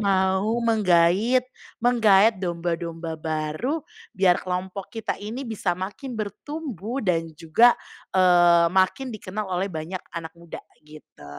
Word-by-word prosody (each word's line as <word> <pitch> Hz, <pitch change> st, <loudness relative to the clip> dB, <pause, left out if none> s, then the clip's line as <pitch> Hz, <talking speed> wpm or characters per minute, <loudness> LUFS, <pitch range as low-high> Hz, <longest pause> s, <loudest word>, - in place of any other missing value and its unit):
mau 195 Hz, +2 st, +1 dB
menggait 210 Hz, +3 st, +3 dB, 0.4 s
menggaet 220 Hz, -3 st, +5 dB
domba-domba 170 Hz, -2 st, -3 dB
baru, 155 Hz, -, -2 dB, 0.4 s
biar 185 Hz, -1 st, +4 dB
kelompok 185 Hz, +1 st, -4 dB
kita 225 Hz, -1 st, -3 dB
ini 225 Hz, +6 st, -5 dB
bisa 215 Hz, -6 st, -2 dB
makin 205 Hz, +8 st, -6 dB
bertumbuh 245 Hz, -, -5 dB
dan 165 Hz, -3 st, 0 dB
juga, 195 Hz, +11 st, +4 dB, 0.4 s
eee, 175 Hz, -2 st, +5 dB
makin 190 Hz, +8 st, +1 dB
dikenal 210 Hz, 0 st, -5 dB
oleh 185 Hz, +2 st, -1 dB
banyak 165 Hz, +2 st, -5 dB, 0.2 s
anak 165 Hz, -1 st, -5 dB
muda, 170 Hz, -1 st, -9 dB, 0.2 s
gitu. 150 Hz, -, -15 dB
190 Hz, 115 wpm, -24 LUFS, 170-220 Hz, 0.4 s, menggaet